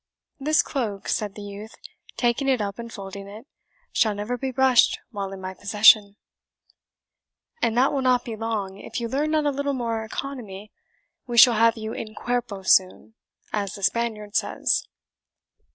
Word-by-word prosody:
"This 305 +3 +3
cloak," 215 -8 -4
said 210 -2 -1
the 210 - -8
youth, 205 +2 -9 0.4
taking 245 +3 +1
it 260 -2 +2
up 200 +1 -4
and 235 0 -7
folding 195 -1 -8
it, 215 +5 -11 0.5
"shall 215 -3 +2
never 210 +4 -3
be 265 +2 -3
brushed 260 -1 +4
while 200 -3 -4
in 195 - -8
my 185 0 -6
possession." 205 +1 +5 1.5
"And 230 0 +1
that 260 +3 +3
will 275 - 0
not 250 -1 +2
be 230 - -5
long, 210 -3 -4
if - - -6
you 235 - -3
learn 280 +6 -1
not 310 -1 +1
a 290 - +2
little 280 0 -2
more 230 -3 -2
economy; 220 -4 -7 0.6
we 240 -1 -3
shall 240 +1 +9
have 230 +1 +3
you 220 0 -5
in 215 0 -7
CUERPO 240 -5 -3
soon, 190 +3 +2 0.4
as 200 -2 -2
the 200 - -10
Spaniard 215 -2 -1
says." - - 0
225 Hz, 170 wpm, -24 LUFS, 205-245 Hz, 1.5 s, shall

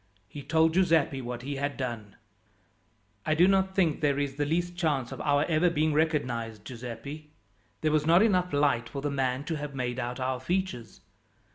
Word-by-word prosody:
He 145 - -8
told 160 +2 +2
Giuseppi 165 -7 +2
what 120 0 -6
he 140 +1 -4
had 145 +1 -2
done. 115 -6 -5 1.1
"I 155 - +1
do 175 +3 +5
not 190 0 +2
think 170 -6 +2
there 145 -2 +2
is 140 -1 -1
the 145 +1 -2
least 175 +3 -1
chance 150 -8 -1
of - - -6
our 145 0 +2
ever 170 +2 +3
being 155 -1 +1
recognized, 125 -9 -1
Giuseppi. 125 +6 -8 0.5
There 155 - +1
was 155 0 +1
not 170 +5 +6
enough 180 -5 +2
light 140 -5 +1
for 140 -1 -6
the 145 - -1
man 130 -1 -1
to 160 +1 -3
have 145 -1 -6
made 125 -1 -2
out 125 +1 -4
our 130 0 -1
features. 130 - -3
145 Hz, 185 wpm, -28 LUFS, 125-160 Hz, 1.1 s, not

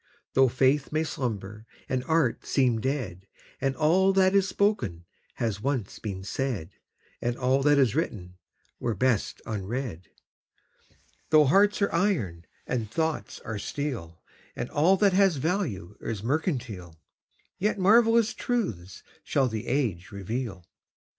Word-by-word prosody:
Though 135 0 +5
faith 135 +3 +2
may 155 +1 +1
slumber 110 -7 -4 0.2
and 130 -1 -1
art 160 -6 +1
seem 125 -5 +1
dead, 110 -9 -3 0.3
And 135 -1 0
all 185 +5 +3
that 190 0 +4
is 195 -1 +4
spoken 120 - 0 0.3
has 110 -3 -2
once 130 -6 -2
been 95 -3 -5
said, 100 -4 -3 0.5
And 120 0 -1
all 130 +1 +2
that 145 +1 +4
is 130 -6 +4
written 95 - -3 0.4
were 115 -3 -1
best 120 +1 0
unread; 105 -3 -4 1.2
Though 155 -1 +6
hearts 200 +8 +4
are 200 - 0
iron 140 - 0 0.2
and 115 -4 -2
thoughts 160 +4 -2
are 110 -2 -5
steel, 105 - -5 0.3
And 120 - -4
all 170 +6 +4
that 200 -1 +3
has 195 -2 +4
value 135 - -2
is 110 -3 -4
mercantile, 120 - -2 0.6
Yet 210 +2 +1
marvellous 225 +3 +4
truths 105 - -3 0.2
shall 135 -2 +1
the 110 -3 -4
age 115 -10 -1
reveal. 100 -1 -4
130 Hz, 135 wpm, -27 LUFS, 105-160 Hz, 1.2 s, Though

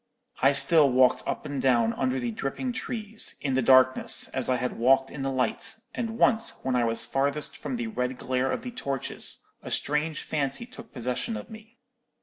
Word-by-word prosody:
I 135 - +6
still 150 0 +5
walked 125 0 +4
up - - -3
and 140 -2 -3
down 120 -3 +3
under 130 0 -1
the 120 -2 -2
dripping 135 - -3
trees, 220 -3 -4
in 135 -2 -2
the 130 - +2
darkness, 130 +1 +5
as 130 -1 -1
I 130 - +3
had 125 -1 -3
walked 135 +2 +3
in 145 - -7
the 135 - -1
light; 130 +9 -1 0.2
and 230 -1 -4
once 230 -1 +2
when 130 -1 0
I 120 -1 +2
was 115 0 -1
farthest 140 +2 -1
from 260 - -5
the 240 -1 -3
red 130 - -3
glare 130 +1 -1
of 235 - -3
the 250 - -5
torches, 140 - -3 0.2
a - - -8
strange 150 +1 -1
fancy 140 - -2
took 235 -2 -13
possession 125 - -3
of - - -10
me. 220 +2 -13
135 Hz, 195 wpm, -27 LUFS, -, 0.2 s, I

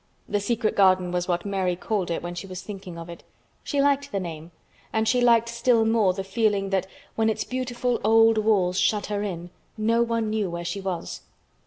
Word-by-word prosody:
The 205 - 0
Secret 220 +2 -1
Garden 185 -2 +4
was 180 0 -1
what 175 0 -1
Mary 190 -3 0
called 190 0 -2
it 170 - -2
when 175 0 -4
she 175 +3 -7
was 185 -1 -7
thinking 190 -4 -8
of 165 0 -8
it. 170 -1 -10 0.4
She 285 - -2
liked 285 0 +2
the 200 - -1
name, 165 -3 -7 0.4
and 220 0 0
she 250 +1 +3
liked 235 -1 +4
still 235 -1 +2
more 220 -4 +3
the 190 +1 -4
feeling 200 -1 0
that 190 -1 0 0.3
when 225 0 +1
its 220 0 -1
beautiful 250 -1 -2
old 225 +1 +5
walls 195 -4 +2
shut 210 -2 +1
her 205 - -1
in 175 -4 -5 0.3
no 225 +2 +2
one 230 -2 0
knew 215 -3 -1
where 170 0 -5
she 195 +3 -3
was. 185 -3 -4
205 Hz, 205 wpm, -25 LUFS, 185-225 Hz, 0.4 s, old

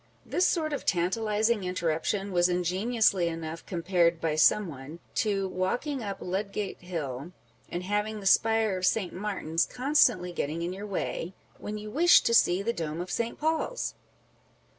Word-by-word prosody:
This 360 - +2
sort 310 -3 0
of 285 - -3
tantalizing 210 +4 +1
interruption 180 +3 -1
was 175 0 +3
ingeniously 185 +2 +1
enough 165 0 -5
compared 170 -2 +1
by 165 -2 0
some 190 +6 +4
one, 145 +1 -9 0.2
to 200 -4 0
walking 240 +10 -2
up 200 -3 -4
Ludgate 200 +2 -3
hill, 160 -3 -5 0.4
and 175 +1 -4
having 210 +2 -1
the 200 - -10
spire 220 0 +3
of 185 - 0
St. 200 -5 0
Martin's 185 -4 -1
constantly 250 -9 +2
getting 165 0 -3
in 175 +2 -2
your 200 +2 -7
way, 185 -2 -3 0.2
when 210 +1 -5
you 210 0 -7
wish 345 +7 +6
to 230 - 0
see 190 -4 +4
the 235 +3 0
dome 160 -3 -4
of 180 +1 -5
St. 235 0 -2
Paul's 320 +10 -1
190 Hz, 160 wpm, -28 LUFS, 175-220 Hz, 0.4 s, wish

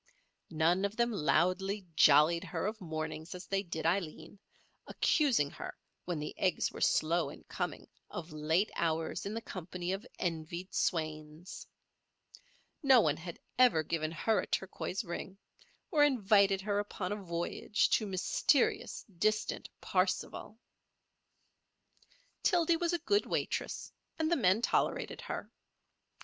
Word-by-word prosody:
None 170 +4 +2
of 200 +1 -1
them 235 +1 +2
loudly 190 +2 +1
"jollied" 155 +4 +6
her 185 - -3
of 215 +1 -3
mornings 160 0 -5
as 180 - -8
they 195 0 0
did 170 -4 -5
Aileen, 170 +1 -2 0.5
accusing 245 - +2
her, - - -8 0.3
when 175 -2 -2
the 150 0 -4
eggs 185 - +1
were - - -9
slow 170 +2 +2
in - - -12
coming, - - -4 0.2
of 170 0 -7
late 160 +6 +1
hours 165 +2 -1
in 210 - -4
the 230 - -4
company 180 -1 -5
of 195 - -4
envied 170 +1 -4
swains. 155 0 -3 1.1
No 270 -4 +7
one 155 -8 +2
had 170 0 -7 0.2
ever 245 -11 +5
given 155 0 -2
her 205 +6 +1
a - - -3
turquoise 190 +1 -2
ring 185 +1 -6 0.5
or 300 -4 +5
invited 200 -7 +4
her 205 +1 0
upon 205 -2 -4
a - - 0
voyage 175 +3 0
to 215 - +2
mysterious, 195 - +1 0.2
distant 215 +2 0
"Parsifal." 185 +3 -1 1.8
Tildy 340 -3 +3
was 340 0 0
a - - +2
good 410 +1 +2
waitress, - - -2 0.2
and 320 0 0
the - - +5
men 205 - +3
tolerated - - 0
her. - - -6
185 Hz, 135 wpm, -32 LUFS, 165-210 Hz, 1.8 s, No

